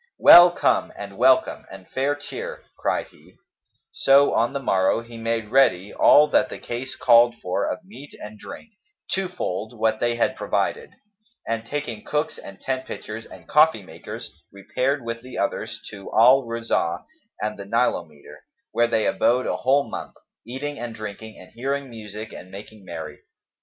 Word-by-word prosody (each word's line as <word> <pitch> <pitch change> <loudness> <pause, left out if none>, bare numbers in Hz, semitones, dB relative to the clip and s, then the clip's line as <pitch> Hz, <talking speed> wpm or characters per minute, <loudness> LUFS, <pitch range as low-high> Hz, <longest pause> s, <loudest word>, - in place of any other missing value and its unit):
"Well 175 +1 +10
come, 175 - +1
and - - -8
welcome - - +3
and 95 -1 -12
fair 135 +2 -1
cheer!" 145 0 -7
cried - - -2
he; - - -22 0.6
so 140 +1 +4
on 115 +1 +2
the 140 - -2
morrow, 95 -4 +1
he 115 0 -13
made 115 -1 -2
ready 105 -8 +3
all 150 +1 +6
that - - +3
the - - -7
case 125 +2 -6
called 120 0 +5
for 90 0 -2
of 210 - -5
meat 145 -8 -13
and 105 0 -10
drink, 230 - -10 0.4
two 190 0 0
fold 115 - -5
what 110 0 +1
they 120 0 +1
had 120 - +1
provided, - - -2 0.6
and 115 0 -3
taking 130 -7 -4
cooks 150 +1 -2
and 100 0 -11
tent 130 0 -3
pitchers 110 +1 -7
and - - -14
coffee 150 -8 +4
makers,[FN#262] 85 -2 -9
repaired 125 +7 -2
with 115 0 -4
the 130 +1 -9
others 115 -1 -2
to 100 -2 -10
Al 125 +4 +6
Rauzah[FN#263] 115 -7 -1 0.4
and 105 -1 -3
the 100 - -7
Nilometer, 85 -10 -2 0.3
where 120 0 +2
they 115 -2 +1
abode 125 +2 +2
a - - -1
whole 140 +2 +2
month, - - -7 0.3
eating 145 +4 -5
and 120 -1 -6
drinking 110 0 -8
and 90 - -14
hearing 135 +2 -3
music 110 -1 -8
and 90 - -10
making 100 +2 -11
merry. 85 -3 -8
115 Hz, 170 wpm, -23 LUFS, 105-135 Hz, 0.6 s, Well